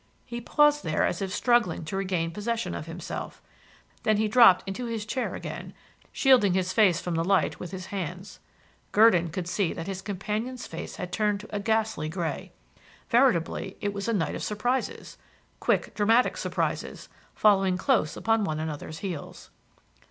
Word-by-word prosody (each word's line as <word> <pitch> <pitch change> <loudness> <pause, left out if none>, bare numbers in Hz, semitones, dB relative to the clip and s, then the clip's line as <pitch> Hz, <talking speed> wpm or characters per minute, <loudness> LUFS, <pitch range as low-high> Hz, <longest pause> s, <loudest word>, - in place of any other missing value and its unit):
He 240 -1 -6
paused 295 +4 +3
there 155 -1 +1
as 175 - -2
if 190 -1 -2
struggling 230 -6 +2
to 160 - -5
regain 185 -4 -1
possession 210 - -2
of 85 -2 -6
himself; - - -6 0.6
then 215 -1 +2
he 215 +1 +2
dropped 220 -5 +7
into 195 +6 -4
his 225 -2 -3
chair 255 +4 -2
again, - - -7 0.4
shielding 240 -9 +4
his 185 0 0
face 185 -5 +4
from 175 - -4
the 165 0 0
light 190 -1 +1
with 180 - -6
his 185 0 -7
hands. 180 0 -5 0.5
Gurdon 205 -6 +5
could 175 +2 -4
see 180 -1 0
that 165 - -6
his 190 0 -5
companion's 215 +6 -4
face 165 - -7
had 180 -1 -6
turned 210 -1 0
to 210 - -9
a - - 0
ghastly 220 -6 0
grey. 170 -1 -4 0.6
Veritably 205 -6 +2
it 205 -1 -2
was 200 +1 -4
a 230 - +1
night 180 -6 0
of - - -5
surprises, 245 +5 -2 0.4
quick, - - 0
dramatic 225 +4 +3
surprises, - - -3 0.3
following 195 -3 +4
close 220 - +1
upon 225 -1 +1
one 155 -6 -2
another's 155 0 -5
heels. 175 -6 -7
200 Hz, 165 wpm, -27 LUFS, 175-225 Hz, 0.6 s, dropped